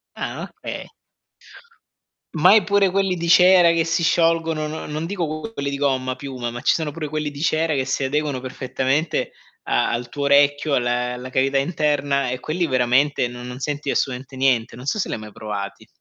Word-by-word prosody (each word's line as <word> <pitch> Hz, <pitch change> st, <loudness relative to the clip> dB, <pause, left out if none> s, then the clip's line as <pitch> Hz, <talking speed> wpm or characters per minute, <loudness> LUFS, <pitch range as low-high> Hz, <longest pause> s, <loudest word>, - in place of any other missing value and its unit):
Ah, -, -, -5 dB
okay. -, -, -5 dB, 1.5 s
Mai, 185 Hz, +7 st, +6 dB
pure 200 Hz, -1 st, +3 dB
quelli 195 Hz, -1 st, +1 dB
di 170 Hz, -1 st, -3 dB
cera 180 Hz, -1 st, +7 dB
che 165 Hz, -1 st, +1 dB
si 165 Hz, +1 st, 0 dB
sciolgono, 165 Hz, -2 st, +2 dB
non 155 Hz, 0 st, -6 dB
non 155 Hz, +2 st, -3 dB
dico 165 Hz, -4 st, -3 dB
q 225 Hz, -, -7 dB
quelli 140 Hz, -8 st, -3 dB
di 140 Hz, -, -3 dB
gomma 130 Hz, -2 st, 0 dB
piuma, 130 Hz, -3 st, -5 dB
ma 120 Hz, -, -6 dB
ci -, -, +3 dB
sono 160 Hz, -3 st, -2 dB
pure 155 Hz, +1 st, -5 dB
quelli 150 Hz, 0 st, -3 dB
di 145 Hz, 0 st, -8 dB
cera 160 Hz, 0 st, +1 dB
che 135 Hz, -2 st, 0 dB
si 130 Hz, +1 st, -1 dB
adeguano 140 Hz, -1 st, -1 dB
perfettamente 130 Hz, +4 st, -1 dB, 0.3 s
a -, -, +1 dB
al 120 Hz, 0 st, -3 dB
tuo 145 Hz, +2 st, -4 dB
orecchio, 145 Hz, +1 st, +3 dB
alle 125 Hz, 0 st, 0 dB
alla 125 Hz, +1 st, -7 dB
cavità 135 Hz, +2 st, +1 dB
interna 140 Hz, -2 st, 0 dB
e 125 Hz, +1 st, -3 dB
quelli 170 Hz, +2 st, -1 dB
veramente 130 Hz, +1 st, +2 dB
no 120 Hz, 0 st, -9 dB
non 125 Hz, +1 st, -7 dB
senti 145 Hz, +1 st, -3 dB
assolutamente 130 Hz, +1 st, -2 dB
niente. 130 Hz, -4 st, +1 dB
Non 125 Hz, +2 st, -10 dB
so 215 Hz, -, -1 dB
se -, -, 0 dB
li -, -, -4 dB
hai 110 Hz, -, -8 dB
mai 105 Hz, 0 st, -10 dB
provati. 105 Hz, -2 st, -6 dB
140 Hz, 195 wpm, -22 LUFS, 130-160 Hz, 1.5 s, cera